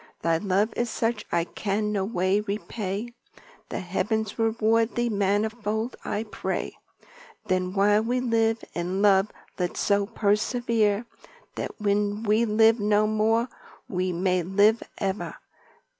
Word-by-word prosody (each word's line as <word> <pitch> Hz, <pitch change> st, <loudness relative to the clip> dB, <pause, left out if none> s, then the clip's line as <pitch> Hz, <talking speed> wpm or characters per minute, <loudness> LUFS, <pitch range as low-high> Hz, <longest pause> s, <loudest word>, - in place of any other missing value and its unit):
Thy 165 Hz, 0 st, +3 dB
love 205 Hz, +3 st, +1 dB
is 240 Hz, 0 st, -1 dB
such 225 Hz, 0 st, -2 dB
I 170 Hz, -, +2 dB
can 210 Hz, +4 st, -2 dB
no 200 Hz, -2 st, 0 dB
way 190 Hz, -1 st, +1 dB
repay, 210 Hz, +1 st, -4 dB, 0.6 s
The -, -, -3 dB
heavens 210 Hz, +4 st, -2 dB
reward 225 Hz, 0 st, +2 dB
thee, 240 Hz, 0 st, +1 dB
manifold 215 Hz, +3 st, -1 dB
I 210 Hz, -, -2 dB
pray. 215 Hz, -, -4 dB, 0.7 s
Then 185 Hz, 0 st, 0 dB
while 205 Hz, +2 st, +4 dB
we 245 Hz, +3 st, 0 dB
live 225 Hz, -2 st, +1 dB
in 180 Hz, +3 st, -2 dB
love 195 Hz, 0 st, +4 dB, 0.3 s
let's 180 Hz, -1 st, -2 dB
so 200 Hz, -1 st, +2 dB
persevere, 215 Hz, 0 st, +1 dB, 0.5 s
That -, -, -6 dB
when 205 Hz, +1 st, 0 dB
we 220 Hz, +2 st, +3 dB
live 225 Hz, +1 st, +4 dB
no 210 Hz, 0 st, +3 dB
more, 220 Hz, +2 st, +2 dB, 0.4 s
we 185 Hz, -1 st, -1 dB
may 180 Hz, +1 st, +1 dB
live 205 Hz, +6 st, +3 dB, 0.2 s
ever." 195 Hz, 0 st, -3 dB
210 Hz, 130 wpm, -26 LUFS, 195-225 Hz, 0.7 s, while